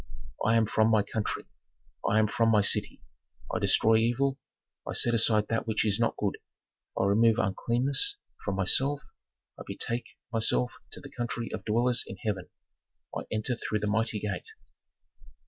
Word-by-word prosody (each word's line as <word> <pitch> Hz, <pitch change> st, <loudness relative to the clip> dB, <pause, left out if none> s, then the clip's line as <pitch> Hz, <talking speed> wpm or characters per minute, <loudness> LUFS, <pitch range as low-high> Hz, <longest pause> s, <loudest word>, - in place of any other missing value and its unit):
"I 115 Hz, -, +3 dB
am 115 Hz, -1 st, +4 dB
from 110 Hz, +1 st, +2 dB
my 110 Hz, -2 st, +4 dB
country, 110 Hz, 0 st, -3 dB, 0.6 s
I 100 Hz, +2 st, +2 dB
come 110 Hz, 0 st, +4 dB
from 115 Hz, +1 st, +2 dB
my 110 Hz, -2 st, +5 dB
city, 100 Hz, -, 0 dB, 0.5 s
I -, -, +1 dB
destroy 110 Hz, 0 st, +4 dB
evil, 130 Hz, +5 st, +1 dB, 0.5 s
I -, -, -2 dB
set 120 Hz, -, +2 dB
aside 110 Hz, -2 st, +3 dB
that 115 Hz, 0 st, -1 dB
which 110 Hz, 0 st, +1 dB
is 105 Hz, 0 st, +1 dB
not 115 Hz, -, +1 dB
good, 100 Hz, -2 st, -2 dB, 0.6 s
I -, -, +3 dB
remove 110 Hz, +3 st, +4 dB
uncleanness 125 Hz, -, 0 dB, 0.3 s
from 100 Hz, -, -2 dB
myself, 135 Hz, +9 st, +2 dB, 0.6 s
I -, -, -6 dB
betake 120 Hz, 0 st, -4 dB, 0.2 s
myself 65 Hz, -, +1 dB, 0.2 s
to -, -, -7 dB
the -, -, -11 dB
country 120 Hz, -1 st, -4 dB
of -, -, -5 dB
dwellers 120 Hz, +3 st, +2 dB
in -, -, -8 dB
heaven, 100 Hz, -6 st, -3 dB, 0.7 s
I -, -, -4 dB
enter 110 Hz, +3 st, -1 dB
through 110 Hz, -, -2 dB
the -, -, -1 dB
mighty 110 Hz, +1 st, +1 dB
gate. 100 Hz, -3 st, -4 dB
110 Hz, 165 wpm, -29 LUFS, 105-120 Hz, 0.7 s, my